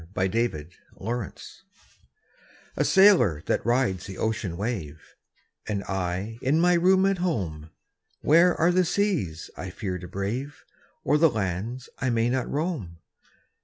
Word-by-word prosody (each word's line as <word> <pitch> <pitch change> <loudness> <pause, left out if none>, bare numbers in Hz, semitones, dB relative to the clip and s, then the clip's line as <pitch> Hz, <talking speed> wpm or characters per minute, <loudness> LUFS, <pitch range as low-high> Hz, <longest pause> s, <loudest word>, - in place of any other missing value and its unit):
THE 95 -5 0 0.4
SAILOR 115 -1 -3 1.4
A - - +1
sailor 170 - +5
that - - 0
rides 120 -7 0
the 95 - -8
ocean 105 -6 -2
wave, 90 -9 -5 0.6
Am 100 -2 -2
I 95 +4 -3
in 140 +5 +2
my 180 +1 +4
room 185 +2 +4
at 195 -2 +1
home: 90 - -2 0.5
Where 170 +4 +5
are 170 +2 +4
the 185 +1 +3
seas 170 - -1
I 95 - -6
iear 90 -1 -5
to 90 - -8
brave. 110 +10 -4 0.4
Or 150 - +2
the 165 0 +6
lands 110 +3 -3
I 130 - 0
may 115 0 +1
not 130 -1 -1
roam? 145 - -3
115 Hz, 135 wpm, -26 LUFS, -, 1.4 s, the